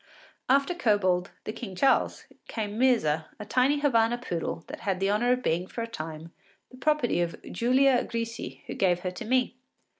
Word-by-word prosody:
After 275 +6 +3
Kobold, 200 - +2
the 215 - -5
King 205 -7 -7
Charles, 270 +8 +2 0.2
came 210 -2 -4
Myrza, 165 -12 +3
a 210 - -6
tiny 260 +6 +2
Havana 235 -4 +3
poodle 170 -8 -4
that - - -8
had 190 -2 -1
the 195 +1 +1
honour 240 +4 +2
of 250 0 -3
being 175 +3 0
for 230 - -5
a - - -4
time 160 -5 -7 0.4
the 255 - -13
property 270 - +1
of 170 -1 -2
Giulia 255 +4 +3
Grisi, 230 0 -5
who - - -5
gave 180 -2 +1
her 185 - -2
to 180 - -7
me. 250 +1 +1
230 Hz, 180 wpm, -27 LUFS, 180-255 Hz, 0.4 s, After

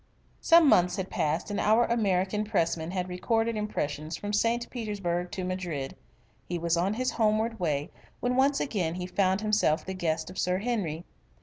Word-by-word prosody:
Some 335 -2 +6
months 180 -8 +4
had 190 -1 -4
passed 160 +7 -1
and 205 - -1
our 220 +3 +4
American 205 -3 +1
Pressman 170 -6 0
had 180 0 -2
recorded 225 +5 0
impressions 155 -7 -3
from 205 0 -5
St. 230 +3 +1
Petersburg 195 -7 -2
to 185 - -3
Madrid. 180 -7 -4 0.5
He 175 - -2
was 170 0 +1
on 185 +5 0
his 255 +2 0
homeward 220 0 +1
way 150 -2 -1 0.3
when 250 0 0
once 275 +2 +3
again 180 - -1
he 180 0 -4
found 190 +1 +1
himself 210 -7 +2
the 190 - -4
guest 165 -2 -2
of 185 - -7
Sir 180 0 +1
Henry. 190 -7 -2
190 Hz, 175 wpm, -28 LUFS, 175-220 Hz, 0.5 s, Some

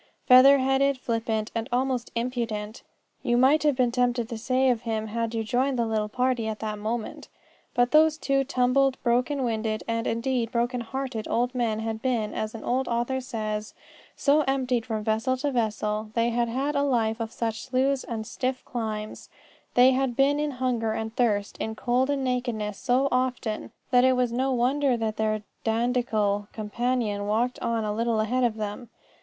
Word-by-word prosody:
Feather 265 +2 +8
headed, 270 +1 +2
flippant, 225 -3 -2
and 230 0 -3
almost 250 -1 -1
impudent, 230 -3 -3 0.4
you 240 -2 +1
might 270 +5 +5
have 295 -2 +2
been 250 -2 +2
tempted 245 -1 +1
to 230 - -4
say 260 +2 +2
of 235 -2 -1
him 220 -2 -2
had 230 +1 -3
you 225 - -1
joined 255 +4 0
the 235 - +1
little 215 -1 -1
party 250 -1 0
at 220 -1 -3
that 215 -1 -4
moment. 220 +1 -4 0.5
But 245 0 +3
those 310 0 +5
two 275 -2 +1
tumbled, 265 0 +2
broken 250 +3 +1
winded, 220 -2 -1
and, 230 0 -1
indeed, 230 0 -1
broken 240 0 0
hearted 255 -2 -4
old 245 +2 0
men 230 -3 -1
had 220 0 -3
been, 230 -5 -1
as 215 +1 -3
an 225 - -8
old 255 +1 0
author 240 +3 -1
says, 215 -3 -4 0.4
so 295 +2 +3
emptied 255 -3 0
from 220 -2 -2
vessel 225 +5 0
to 285 +2 -1
vessel 215 -3 -1
they 230 0 +2
had 235 0 0
had 275 +5 -1
a 280 - +2
life 230 -5 +1
of 225 -1 -3
such 225 -2 -3
sloughs 265 +1 +1
and 220 -2 -5
stiff 255 +3 -3
climbs 215 -3 -5 0.5
they 250 +1 +7
had 260 -2 0
been 280 +2 +3
in 300 0 0
hunger 250 -4 -1
and 220 0 -4
thirst, 210 -4 0
in 220 0 -3
cold 250 +3 +1
and 280 -1 0
nakedness 240 -5 -2
so 260 +1 +2
often 250 -4 -1 0.2
that 250 -1 +5
it 260 0 +5
was 250 -1 +1
no 260 +3 0
wonder 260 +1 +2
that 220 -1 -2
their 215 -1 0 0.2
dandiacal 225 -3 0
companion 215 -1 -1
walked 235 +4 0
on 230 -1 -1
a 210 -1 -1
little 230 0 0
ahead 245 +4 +1
of 235 -3 +1
them. 215 +2 -5
240 Hz, 185 wpm, -26 LUFS, 220-255 Hz, 0.5 s, Feather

